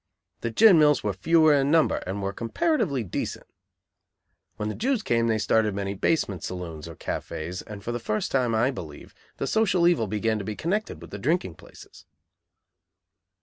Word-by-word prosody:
The 115 Hz, -, -3 dB
gin 190 Hz, -, +6 dB
mills 150 Hz, -2 st, +4 dB
were 105 Hz, -1 st, -1 dB
fewer 155 Hz, -, +4 dB
in 140 Hz, -1 st, +2 dB
number, 160 Hz, 0 st, +3 dB
and 100 Hz, +2 st, -3 dB
were 100 Hz, 0 st, -2 dB
comparatively 140 Hz, -, 0 dB
decent. 95 Hz, -, -4 dB, 1.1 s
When 105 Hz, -, -3 dB
the 110 Hz, -, -2 dB
Jews 250 Hz, -2 st, -1 dB
came 115 Hz, -1 st, +1 dB
they 110 Hz, -1 st, +2 dB
started 110 Hz, -1 st, +1 dB
many 100 Hz, 0 st, -2 dB
basement 100 Hz, -, 0 dB
saloons, 85 Hz, -4 st, -6 dB
or 85 Hz, -, -9 dB
cafés, 85 Hz, +5 st, -5 dB
and 105 Hz, -2 st, -9 dB
for 120 Hz, -, -3 dB
the 120 Hz, -, -3 dB
first 110 Hz, -1 st, -2 dB
time, 125 Hz, -4 st, +1 dB
I 120 Hz, +5 st, +2 dB
believe, 80 Hz, -, -9 dB, 0.2 s
the -, -, -2 dB
social 185 Hz, -1 st, +2 dB
evil 160 Hz, -11 st, +2 dB
began 110 Hz, +2 st, -1 dB
to -, -, -5 dB
be 105 Hz, +2 st, -4 dB
connected 205 Hz, -, -2 dB
with -, -, -12 dB
the 100 Hz, -, -6 dB
drinking 145 Hz, -, 0 dB
places. -, -, -16 dB
115 Hz, 180 wpm, -26 LUFS, 100-155 Hz, 1.1 s, gin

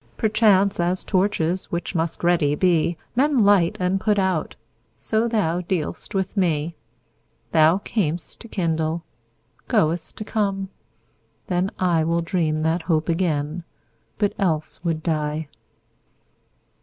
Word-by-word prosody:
Perchance, 205 Hz, -3 st, +3 dB
as 175 Hz, +2 st, 0 dB
torches, 185 Hz, -2 st, 0 dB
which 170 Hz, +2 st, -3 dB
must 165 Hz, -1 st, -2 dB
ready 165 Hz, -4 st, +3 dB
be, 170 Hz, 0 st, +2 dB, 0.2 s
Men 280 Hz, +3 st, +3 dB
light 195 Hz, -4 st, +4 dB
and 185 Hz, +1 st, 0 dB
put 210 Hz, -1 st, +2 dB
out, 190 Hz, -5 st, 0 dB, 0.4 s
so 220 Hz, +1 st, 0 dB
thou 180 Hz, -7 st, 0 dB
dealst 175 Hz, +1 st, -3 dB
with 190 Hz, +1 st, -1 dB
me. 170 Hz, -4 st, 0 dB, 0.8 s
Thou 160 Hz, +3 st, +5 dB
cam'st 175 Hz, -5 st, -3 dB
to 230 Hz, -, -10 dB
kindle, 165 Hz, -4 st, -1 dB, 0.6 s
goest 160 Hz, +1 st, 0 dB
to 215 Hz, -, -5 dB
come: 195 Hz, -3 st, -1 dB, 0.8 s
then 180 Hz, 0 st, 0 dB
IWill 170 Hz, -2 st, +1 dB
dream 155 Hz, -3 st, 0 dB
that 165 Hz, +2 st, +1 dB
hope 160 Hz, -1 st, 0 dB
again, 165 Hz, -1 st, -1 dB, 0.5 s
but 205 Hz, -2 st, +1 dB
else 165 Hz, -4 st, -1 dB
would 165 Hz, -3 st, -1 dB
die. 155 Hz, -2 st, -1 dB
175 Hz, 120 wpm, -23 LUFS, 160-195 Hz, 0.8 s, Thou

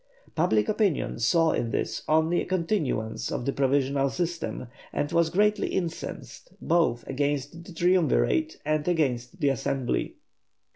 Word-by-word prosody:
Public 130 Hz, -11 st, +2 dB
opinion 205 Hz, -, 0 dB
saw 165 Hz, +7 st, +3 dB
in 115 Hz, -, -1 dB
this -, -, -2 dB
only 160 Hz, +2 st, +3 dB
a -, -, -4 dB
continuance 165 Hz, -, -1 dB
of 120 Hz, -, -3 dB
the 140 Hz, -, 0 dB
provisional 140 Hz, 0 st, +1 dB
system 170 Hz, -3 st, -3 dB, 0.3 s
and 145 Hz, -, -2 dB
was 170 Hz, -1 st, +3 dB
greatly 210 Hz, +4 st, +2 dB
incensed, 175 Hz, -, -5 dB
both 160 Hz, -9 st, +1 dB
against 145 Hz, +3 st, -2 dB
the -, -, -11 dB
Triumvirate 180 Hz, -, +2 dB
and 155 Hz, 0 st, 0 dB
against 145 Hz, -2 st, 0 dB
the 145 Hz, -, +3 dB
Assembly. 130 Hz, -1 st, -1 dB
160 Hz, 135 wpm, -27 LUFS, 135-175 Hz, 0.3 s, saw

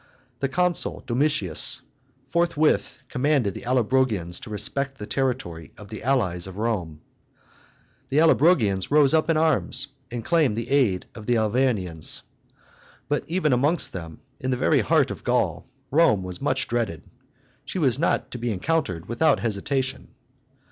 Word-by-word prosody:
The 135 Hz, -, -1 dB
consul 180 Hz, +4 st, 0 dB
Domitius 120 Hz, -, +1 dB, 0.4 s
forthwith 155 Hz, -1 st, +1 dB
commanded 130 Hz, -6 st, +1 dB
the -, -, -8 dB
Allobrogians 120 Hz, -8 st, +1 dB
to -, -, -10 dB
respect 135 Hz, +7 st, -2 dB
the 105 Hz, -, -6 dB
territory 110 Hz, -, -3 dB
of 105 Hz, -2 st, -11 dB
the 110 Hz, -, -7 dB
allies 95 Hz, -10 st, 0 dB
of 95 Hz, 0 st, -9 dB
Rome. 95 Hz, -9 st, -2 dB, 1.1 s
The 140 Hz, -, 0 dB
Allobrogians 145 Hz, -, +3 dB
rose 145 Hz, -1 st, +5 dB
up 160 Hz, +1 st, +2 dB
in 165 Hz, -, +3 dB
arms 155 Hz, -2 st, +2 dB, 0.2 s
and 115 Hz, -2 st, -6 dB
claimed 155 Hz, -10 st, +2 dB
the 115 Hz, +2 st, -4 dB
aid 120 Hz, -10 st, +2 dB
of 105 Hz, -2 st, -11 dB
the 120 Hz, -1 st, +3 dB
Arvernians. 110 Hz, -8 st, 0 dB, 0.9 s
But 145 Hz, -, 0 dB
even 165 Hz, -4 st, +1 dB
amongst 145 Hz, +8 st, +2 dB
them, 80 Hz, -4 st, -8 dB, 0.2 s
in 130 Hz, -, -3 dB
the 125 Hz, -, 0 dB
very 140 Hz, +3 st, +3 dB
heart 100 Hz, -, +2 dB
of -, -, -8 dB
Gaul, -, -, 0 dB, 0.2 s
Rome 135 Hz, -, +4 dB
was 90 Hz, -1 st, -6 dB
much -, -, 0 dB
dreaded; 110 Hz, -9 st, -2 dB, 0.6 s
she -, -, -6 dB
was 135 Hz, -7 st, +1 dB
not 170 Hz, -, 0 dB
to 125 Hz, -, -6 dB
be 120 Hz, 0 st, -2 dB
encountered 95 Hz, -, -1 dB
without 120 Hz, -3 st, +2 dB
hesitation. 130 Hz, +5 st, -2 dB
125 Hz, 150 wpm, -24 LUFS, 100-145 Hz, 1.1 s, rose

